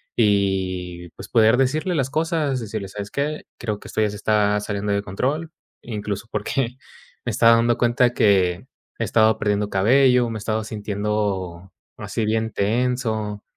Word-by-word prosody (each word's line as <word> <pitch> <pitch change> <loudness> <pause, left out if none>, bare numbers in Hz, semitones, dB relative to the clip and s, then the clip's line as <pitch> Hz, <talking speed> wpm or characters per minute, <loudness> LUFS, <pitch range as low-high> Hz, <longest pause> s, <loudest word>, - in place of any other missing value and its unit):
y 95 -4 0
pues - - -11
poder 110 -1 +5
decirle 155 +7 +1
las 135 -4 0
cosas, 155 -3 0
y - - -5
decirle: 105 -2 -5
"¿Sabes 100 +1 -7
qué?, 150 +2 -2
creo 105 -3 -3
que - - -12
esto - - -2
ya 105 - +2
se 105 - -7
está 105 -1 +2
saliendo 105 0 -3
de 100 0 +1
control", 140 - -2 0.3
incluso, 105 -2 -5
porque 120 +4 -2 0.5
me - - -1
estaba 115 0 +5
dando 115 0 +2
cuenta 120 +1 +2
que 95 -1 +2 0.3
he - - 0
estado 110 0 +3
perdiendo 105 0 0
cabello, 125 +5 +4
me 115 - -5
he - - -7
estado 110 0 -1
sintiendo 100 -4 -3 0.3
así 110 - -3
bien 110 +1 0
tenso 110 -1 -1
110 Hz, 165 wpm, -22 LUFS, 100-120 Hz, 0.5 s, poder